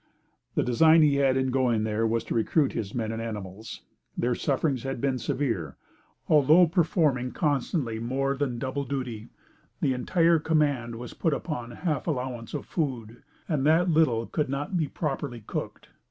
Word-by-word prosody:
The -, -, +2 dB
design 160 Hz, +6 st, +5 dB
he 145 Hz, -2 st, +3 dB
had 135 Hz, -2 st, +3 dB
in 130 Hz, 0 st, 0 dB
going 125 Hz, -4 st, +1 dB
there 110 Hz, +1 st, 0 dB
was 115 Hz, +1 st, 0 dB
to -, -, -4 dB
recruit 135 Hz, +6 st, +2 dB
his 110 Hz, -4 st, -4 dB
men 110 Hz, -2 st, -2 dB
and 115 Hz, 0 st, -4 dB
animals. 105 Hz, -1 st, -7 dB, 0.3 s
Their 125 Hz, +1 st, +1 dB
sufferings 135 Hz, 0 st, 0 dB
had 135 Hz, 0 st, -4 dB
been 130 Hz, 0 st, 0 dB
severe. 110 Hz, -, -2 dB, 0.5 s
Although 155 Hz, +4 st, +6 dB
performing 155 Hz, -7 st, +1 dB
constantly 140 Hz, -5 st, -1 dB
more 135 Hz, +4 st, -1 dB
than 135 Hz, -3 st, -2 dB
double 130 Hz, +3 st, -3 dB
duty, 125 Hz, -5 st, -5 dB, 0.5 s
the 135 Hz, -, +1 dB
entire 165 Hz, +6 st, +2 dB
command 145 Hz, -7 st, 0 dB
was 120 Hz, +1 st, -8 dB
put 160 Hz, -4 st, 0 dB
upon 125 Hz, -8 st, -5 dB
half 150 Hz, +4 st, -3 dB
allowance 125 Hz, -6 st, -3 dB
of -, -, -4 dB
food, 120 Hz, -8 st, -3 dB, 0.3 s
and 150 Hz, -6 st, 0 dB
that 170 Hz, +3 st, +4 dB
little 130 Hz, -8 st, +3 dB
could 150 Hz, +1 st, -2 dB
not 145 Hz, +7 st, -3 dB
be 160 Hz, -4 st, +1 dB
properly 135 Hz, -6 st, -4 dB
cooked. -, -, -6 dB
130 Hz, 165 wpm, -27 LUFS, 115-150 Hz, 0.5 s, Although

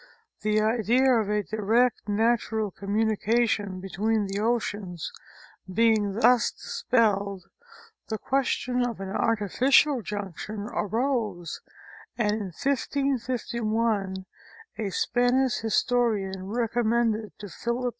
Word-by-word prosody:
The 215 Hz, 0 st, +2 dB
idea 235 Hz, +4 st, +3 dB
of 220 Hz, -4 st, +1 dB
a 210 Hz, 0 st, +1 dB
direct 220 Hz, +2 st, +1 dB
natural 220 Hz, -1 st, +1 dB
communication 210 Hz, 0 st, 0 dB
between 205 Hz, +3 st, -1 dB
the 195 Hz, +1 st, -3 dB
oceans 205 Hz, -6 st, -2 dB, 0.6 s
being 215 Hz, -1 st, +3 dB
thus 235 Hz, +3 st, +4 dB
dispelled, 200 Hz, -6 st, 0 dB, 0.6 s
the 220 Hz, -, -2 dB
question 250 Hz, 0 st, 0 dB
of 240 Hz, -4 st, -3 dB
an 195 Hz, -1 st, -5 dB
artificial 245 Hz, +7 st, +3 dB
junction 205 Hz, 0 st, -5 dB
arose, 215 Hz, -, -1 dB, 0.6 s
and 215 Hz, -3 st, +2 dB
in 210 Hz, -1 st, -2 dB
1551 230 Hz, -, -1 dB, 0.5 s
a 210 Hz, -3 st, -1 dB
Spanish 245 Hz, +5 st, +1 dB
historian 215 Hz, -4 st, 0 dB
recommended 230 Hz, -1 st, 0 dB
to 205 Hz, -, -8 dB
Philip 235 Hz, +5 st, -3 dB
II. 250 Hz, -, +1 dB
220 Hz, 100 wpm, -26 LUFS, 205-240 Hz, 0.6 s, thus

